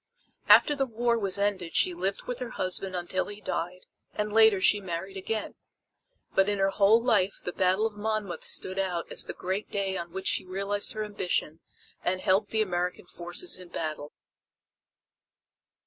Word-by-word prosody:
After 295 - +7
the 270 -1 0
war 235 0 +1
was 195 -2 -1
ended 200 -4 -1
she 180 - +3
lived 190 +3 -2
with 250 0 -5
her 250 -2 -4
husband 185 0 -2
until 180 +1 -1
he 205 0 -8
died, 180 -2 -4 0.3
and 210 0 -2
later 220 -3 +6
she 205 +2 +4
married 190 +1 -5
again. 215 +3 -3 0.8
But 195 +1 +3
in 205 - 0
her 195 0 +2
whole 205 +3 +5
life 210 -5 +2
the 180 - -4
battle 190 +3 +2
of 225 - -1
Monmouth 210 -4 -3
stood 185 +1 0
out 180 -3 -2
as - - -1
the - - -5
great 190 +3 -3
day 195 -1 -1
on 170 -1 -6
which 190 +2 -6
she - - +1
realized 200 +2 -2
her 215 -1 -3
ambition 180 -6 -2 0.4
and 185 +1 0
helped 195 +3 +2
the 220 -1 +2
American 180 -2 -2
forces 175 - -4
in 180 -1 -10
battle. 155 -3 -4
195 Hz, 175 wpm, -28 LUFS, 180-210 Hz, 0.8 s, After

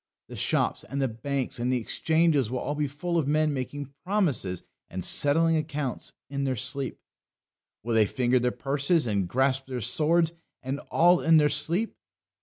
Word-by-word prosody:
The - - -8
shops - - 0
and 140 - -5
the 135 - +2
banks 130 +3 -3
and 125 +2 0
the 125 - +1
exchanges 160 +1 +1
will 130 - -2
all 140 +3 -2
be 150 0 -1
full 170 +5 -2
of 145 - -1
men 155 0 +2
making 140 +1 -5
promises 150 - 0 0.3
and 90 -1 -5
settling 165 +3 +3
accounts 150 -4 -3
in 140 0 -3
their 130 -1 0
sleep. 130 +3 -3 0.9
They 120 - -3
will 110 -1 +5
finger 125 +1 +1
their 125 0 +1
purses, 140 +5 +1
and 100 -5 0
grasp 135 +3 +1
their 130 -2 -4
swords, 160 +8 +1 0.3
and 135 +2 -3
all 175 +1 +4
in 165 0 +5
their 150 -1 +4
sleep. 165 +9 0
140 Hz, 175 wpm, -27 LUFS, 125-155 Hz, 0.9 s, will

